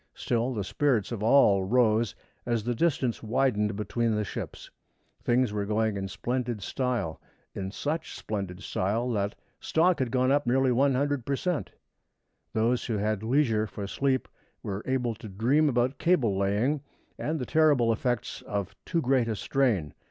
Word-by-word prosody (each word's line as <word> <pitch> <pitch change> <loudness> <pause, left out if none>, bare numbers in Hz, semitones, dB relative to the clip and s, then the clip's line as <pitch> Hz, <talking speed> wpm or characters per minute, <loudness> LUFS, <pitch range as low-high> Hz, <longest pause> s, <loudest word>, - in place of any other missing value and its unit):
Still 120 +2 0
the 105 - -1
spirits 120 0 +1
of 115 -4 -4
all 105 -4 +5
rose 110 -2 +2 0.3
as 120 -3 -1
the 120 +2 0
distance 130 -3 0
widened 110 -3 +1
between 110 +2 0
the 105 - 0
ships. 100 - -7 0.5
Things 120 -2 +2
were 105 -1 -1
going 110 0 +1
in 95 -1 -3
splendid 120 0 -3
style 125 - -2 0.3
in 95 -1 -4
such 150 +10 -3
splendid 95 -3 -5
style 115 +6 -1
that 100 -1 -1 0.2
"stock 175 +2 +2
had 130 -2 0
gone 130 +1 +2
up 145 -2 +2
nearly 130 +1 +3
100 140 +1 +2
per 140 +3 -1
cent." 175 0 -2 0.8
Those 115 +3 +1
who 115 -3 -1
had 105 0 -1
leisure 115 -3 +2
for 100 -1 -6
sleep 130 +5 0 0.4
were 100 0 -3
able 125 -3 0
to 110 0 -10
dream 130 +10 +2
about 125 +1 0
cable 145 - +2
laying 105 +9 +1 0.4
and 155 +2 -1
the 130 - -3
terrible 145 -8 +4
effects 120 0 -2
of 100 -2 -3
too 170 -2 0
great 130 -2 +2
a 110 - -1
strain. 105 - 0
120 Hz, 160 wpm, -28 LUFS, 105-135 Hz, 0.8 s, all